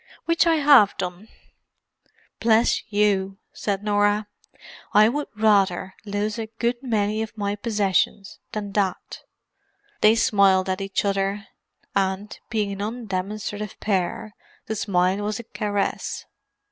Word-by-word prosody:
Which 335 0 +3
I 330 - +4
have 280 -9 +6
done." 180 +3 -5 1.1
"Bless 225 +1 +3
you," 195 -2 +1 0.2
said 200 -1 -2
Norah. 205 0 +2 0.7
"I 210 +1 +7
would 290 +5 -2
rather 195 -4 +2
lose 210 +2 -2
a 220 - -3
good 240 +1 -1
many 215 -4 0
of 220 0 -6
my 205 0 -1
possessions 205 -2 0
than 205 -2 -4
that." 195 -2 -2 0.8
They 215 +1 +6
smiled 195 -4 +3
at 185 +1 -1
each 195 +1 -1
other; 200 +1 -1 0.5
and, 195 +1 -1
being 210 -2 -1
an 200 0 -5
undemonstrative 210 -1 -4
pair, 200 +1 -1 0.3
the 220 - -3
smile 185 -2 +1
was 205 0 -2
a - - -6
caress. 205 -3 -3
205 Hz, 125 wpm, -24 LUFS, 195-215 Hz, 1.1 s, I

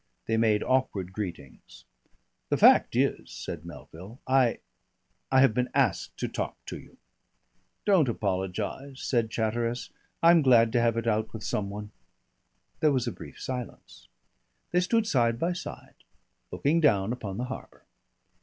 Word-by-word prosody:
They 110 - 0
made 110 -2 +2
awkward 105 -8 0
greetings. 90 -10 -8 0.6
"The - - +1
fact - - +6
is," - - 0
said 85 0 -7
Melville, 85 - -11
"I 130 -3 +3 0.7
I 130 0 +6
have 135 -5 +5
been 125 +2 0
asked 130 -9 +1
to - - -2
talk - - -4
to - - -6
you." - - -17 0.9
"Don't 185 -10 +4
apologise," 100 +7 -3
said 115 -4 +1
Chatteris. 115 +2 -2 0.3
"I'm 170 0 +7
glad 120 -5 +5
to 120 - +3
have 115 -1 +2
it 115 - -2
out 110 -1 0
with 110 -2 -7
some 100 0 -2
one." 105 +1 -7 0.9
There 155 - +4
was 130 -3 +1
a 120 - -2
brief - - -11
silence. 125 -2 -7 0.6
They 180 - +3
stood 220 +5 +1
side 120 - +2
by 170 +7 0
side 175 - -9 0.5
looking 155 +4 +1
down 105 -6 +3
upon 105 -6 -6
the 125 - -2
harbour. 130 +1 -9
115 Hz, 150 wpm, -28 LUFS, 105-130 Hz, 0.9 s, I'm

